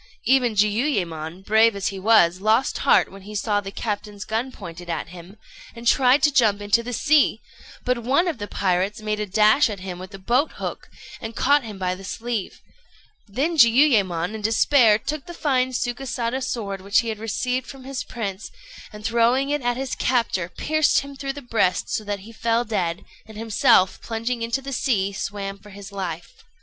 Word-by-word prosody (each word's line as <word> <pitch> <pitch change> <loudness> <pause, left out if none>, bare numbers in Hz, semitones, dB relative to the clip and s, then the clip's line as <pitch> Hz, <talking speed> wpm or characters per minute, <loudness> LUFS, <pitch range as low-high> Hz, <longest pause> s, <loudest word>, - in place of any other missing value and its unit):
Even 250 -4 +3
Jiuyémon, 195 - -1
brave 220 +1 +4
as 200 -1 -1
he 195 -1 -7
was, 185 -4 +4
lost 220 +5 +2
heart 280 - +3
when 195 0 -12
he 210 +2 -10
saw 205 0 0
the 195 - -7
captain's 205 0 -5
gun 230 +4 -2
pointed 175 -5 -10
at 165 - -3
him, 180 +3 -12 0.4
and 235 0 -10
tried 255 +3 +4
to 295 - +4
jump 220 -6 +3
into 205 +3 +2
the 245 +1 -6
sea; 300 +5 +3 0.5
but 250 -1 +1
one 275 +10 +1
of 320 -9 -2
the 205 - -5
pirates 195 +2 0
made 210 0 -2
a 210 - -2
dash 215 +7 +4
at 200 -3 -6
him 185 -2 -6
with 185 +2 -9
a - - -8
boat 245 +10 0
hook, - - -6 0.3
and 225 -1 -6
caught 285 +1 +3
him 215 -3 -8
by 185 -1 -1
the 190 +1 -10
sleeve; 225 0 -4 0.7
then 285 +11 -1
Jiuyémon, 225 - +4
in 220 - -6
despair, 225 +1 +4
took 290 +6 -5
the 345 - -8
fine 260 -5 +1
Sukésada 245 0 -2
sword 200 -6 -4
which 200 +4 +2
he 235 - -4
had 215 -1 -4
received 250 +3 -2
from 270 -1 -10
his 270 0 -5
prince, 205 -4 -5 0.4
and 210 0 -11
throwing 235 +4 +2
it 295 -1 0
at 245 0 -1
his 265 -1 -3
captor, 230 -8 0
pierced 310 - +1
him 280 0 -10
through 275 0 -4
the 285 0 -9
breast 225 -6 0
so 215 - -1
that 205 -1 -4
he 220 +4 -12
fell 230 +1 0
dead, 180 -5 -2 0.2
and 220 -1 -12
himself 215 -4 +3
plunging 230 +1 -3
into 235 +4 -2
the 275 0 -5
sea 200 -6 0
swam 195 0 -5
for 210 - -15
his 200 +1 -11
life. 175 -4 -6
220 Hz, 195 wpm, -23 LUFS, 200-250 Hz, 0.7 s, brave